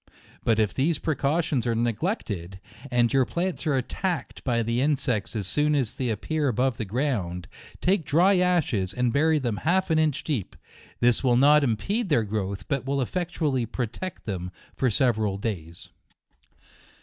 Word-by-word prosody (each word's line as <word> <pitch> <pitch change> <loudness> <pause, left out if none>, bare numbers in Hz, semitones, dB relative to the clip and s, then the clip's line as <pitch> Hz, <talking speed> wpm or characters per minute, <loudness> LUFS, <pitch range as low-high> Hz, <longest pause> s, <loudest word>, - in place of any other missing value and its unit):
But 115 - +2
if 110 -2 +1
these 150 +4 +1
precautions 145 -4 0
are 115 - +1
neglected, 110 - -2 0.3
and 120 -1 +2
your 135 -1 +5
plants 175 +5 -2
are 145 - +2
attacked 160 +4 -3
by 120 -3 +1
the 115 +2 0
insects 125 -8 0
as 105 -3 -2
soon 150 +9 +1
as 130 -6 0
they 125 -2 -2
appear 145 +8 -1
above 125 0 0
ground, 95 - -2 0.3
take 185 -1 +2
dry 180 +7 +4
ashes, 135 - +1
and 125 -2 +1
bury 155 +2 +3
them 120 -7 -1
half 180 - +1
an 160 - +4
inch 150 -2 +1
deep; 130 - -3 0.5
this 120 +1 +3
will 125 -2 +4
not 145 +3 +6
impede 195 - 0
their 120 -7 +3
growth, 100 -2 -3
but 140 -4 -1
will 140 +1 -1
effectually 150 -4 -1
pro 120 +2 -2
tect 185 - -7
them 90 -4 -4 0.3
for 130 - +1
several 110 -4 +1
day*. 95 -6 -4
130 Hz, 160 wpm, -26 LUFS, 110-155 Hz, 0.5 s, not